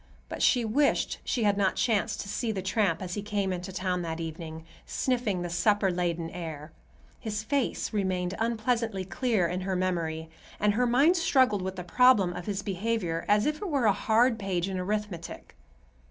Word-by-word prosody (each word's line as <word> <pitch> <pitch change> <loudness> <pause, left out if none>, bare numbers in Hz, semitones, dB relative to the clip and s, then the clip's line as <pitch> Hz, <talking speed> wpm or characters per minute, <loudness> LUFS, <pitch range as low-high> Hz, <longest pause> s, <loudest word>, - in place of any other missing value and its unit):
But - - -5
she 245 -3 +4
wished 280 +7 +1
she 240 - -1
had 205 -1 +2
not 190 -2 +2
chanced 220 -5 0
to - - -8
see 220 +3 -2
the 190 -3 -4
tramp 190 -3 +1
as 180 -1 -5
he 205 - -3
came 200 -2 -1
into 180 +1 -5
town 185 -1 -1
that 165 -1 -4
evening, 160 0 -6 0.2
sniffing 235 -8 -1
the 175 - -3
supper 205 +2 +2
laden 170 -2 -2
air. 155 -3 -7 0.5
His 210 -1 -3
face 275 -2 -1
remained 185 -3 -1
unpleasantly 225 -3 0
clear 220 -2 0
in 180 +2 -3
her 190 0 -2
memory, 165 -3 -2 0.3
and 210 0 +3
her 245 +3 +2
mind 280 +9 +4
struggled 260 - +3
with 190 +1 -4
the 180 - -5
problem 200 -1 +4
of 175 - -7
his 200 -1 -2
behavior 195 -4 -2
as 210 +1 +3
if 300 0 0
it 405 +1 -5
were 280 -6 +1
a 210 - +5
hard 225 +3 +2
page 190 -3 -1
in 190 -1 -3
arithmetic. 200 -3 -4
195 Hz, 185 wpm, -28 LUFS, 180-225 Hz, 0.5 s, a